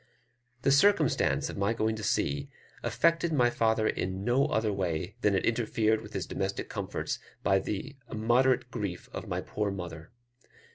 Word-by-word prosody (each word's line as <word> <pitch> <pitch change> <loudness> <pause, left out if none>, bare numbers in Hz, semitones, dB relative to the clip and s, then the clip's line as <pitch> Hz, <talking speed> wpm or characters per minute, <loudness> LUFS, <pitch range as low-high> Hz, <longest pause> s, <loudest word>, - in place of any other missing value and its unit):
The 135 - +4
circumstance 155 0 +3
of - - -6
my 100 +3 +1
going 110 0 0
to - - -6
sea 70 -6 0 0.3
affected 170 0 +2
my 125 -5 +3
father 110 -2 +2
in 95 +1 -2
no 130 +5 +3
other 110 -6 0
way 90 0 -2
than 105 -2 +3
it - - +1
interfered 110 -1 +1
with 110 -1 -11
his 95 - -2
domestic 95 0 -3
comforts - - -3 0.2
by 95 -1 +4
the 130 +9 -5
immoderate 125 +3 +2
grief 100 -6 -4
of - - -6
my - - -2
poor 105 -1 -2
mother. 85 -4 -7
110 Hz, 160 wpm, -29 LUFS, 95-125 Hz, 0.3 s, The